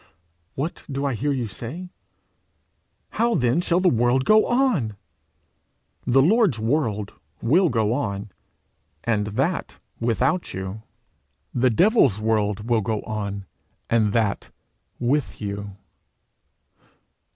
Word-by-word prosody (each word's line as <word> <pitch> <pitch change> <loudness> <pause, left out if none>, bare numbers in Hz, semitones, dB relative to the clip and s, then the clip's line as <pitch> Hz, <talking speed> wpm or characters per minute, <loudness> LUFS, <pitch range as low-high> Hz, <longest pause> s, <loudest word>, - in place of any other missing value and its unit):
What 150 +6 -4
do 140 +1 -2
I 140 - 0
hear 140 +6 -1
you 125 -4 -1
say? 130 - -7 1.2
'How 235 0 +1
then 125 +2 +2
shall 175 0 +2
the 185 - +2
world 120 -1 +3
go 215 0 +5
on?' 220 - +1 1.1
The 135 +2 +5
Lord's 200 - +3
world 110 -4 -1 0.3
will 170 +9 +3
go 110 -3 +1
on, 100 -6 -3 0.7
and 105 -3 0
that 135 - -2 0.2
without 125 +9 0
you; 95 +3 -5 0.7
the 125 +1 +3
devil's 140 - +4
world 105 -1 0
will 115 -2 +2
go 105 +1 -2
on, 100 -2 -4 0.5
and 110 -3 +3
that 110 -2 0 0.5
with 135 +4 0
you. 100 -1 -5
120 Hz, 115 wpm, -23 LUFS, 105-150 Hz, 1.2 s, go